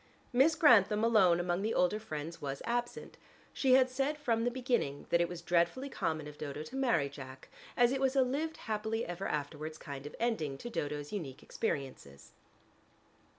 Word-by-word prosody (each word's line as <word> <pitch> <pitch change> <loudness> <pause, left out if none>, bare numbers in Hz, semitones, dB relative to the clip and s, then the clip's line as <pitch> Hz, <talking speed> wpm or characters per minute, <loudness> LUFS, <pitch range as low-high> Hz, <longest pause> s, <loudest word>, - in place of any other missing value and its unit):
Miss 275 +6 +5
Grantham 220 - +5
alone 195 -7 +5
among 175 +1 0
the 220 +2 -1
older 180 +4 +2
friends 160 -5 -6
was 140 -1 -4
absent: 240 0 -3 0.4
she 265 -2 +3
had 260 0 +6
said 270 +4 -1
from 230 -6 0
the - - +3
beginning 240 - -1
that 170 - +4
it 170 - +1
was 175 -1 -7
dreadfully 175 +11 +1
common 155 - -2
of 150 0 -11
Dodo 150 0 -5
to 205 - -10
marry 235 - +2
Jack, 135 -2 -10 0.3
as 245 0 +5
it 270 0 -1
was 265 0 +2
a 265 - +5
"lived 300 +5 -2
happily 220 +1 -2
ever 175 +2 -4
afterwards" 150 +1 -4
kind 140 -1 -7
of - - -10
ending 160 -13 -1
to 240 - -7
Dodo's 145 -4 -4
unique 145 -10 -5
experiences. 130 - -4
195 Hz, 180 wpm, -32 LUFS, 150-245 Hz, 0.4 s, had